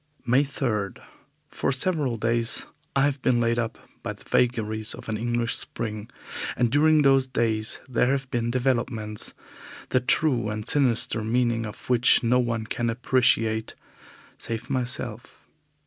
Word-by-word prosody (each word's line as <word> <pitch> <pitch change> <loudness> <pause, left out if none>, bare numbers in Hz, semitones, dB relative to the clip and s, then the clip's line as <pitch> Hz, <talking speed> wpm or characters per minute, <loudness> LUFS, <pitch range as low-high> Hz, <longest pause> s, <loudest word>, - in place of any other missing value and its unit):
May 125 +4 +4
3. 115 -8 -2 0.6
For - - -1
several 135 -3 0
days 115 +1 +2 0.3
I 135 - +4
have 140 -1 0
been 125 -2 +2
laid 115 0 +1
up 115 -1 -3 0.2
by - - -4
the - - -17
vagaries 110 -3 0
of - - -12
an 110 - -1
English 120 +1 -1
spring, 110 -2 -5 0.5
and 120 -2 +2
during 155 +1 +4
those 135 -1 +4
days 110 -3 0
there 125 -1 +1
have 135 0 0
been 120 -2 -1
developments, 120 -4 -1 0.5
the 130 - +3
true 125 -3 +1
and 105 +1 -5
sinister 120 -4 +2
meaning 115 0 0
of 105 - -11
which 125 +1 +4
no 125 +2 +3
one 115 -2 -1
can 120 +1 -2
appreciate 115 -2 +1 0.6
save 115 +3 -5
myself. 125 -2 -3
120 Hz, 145 wpm, -25 LUFS, 115-130 Hz, 0.6 s, May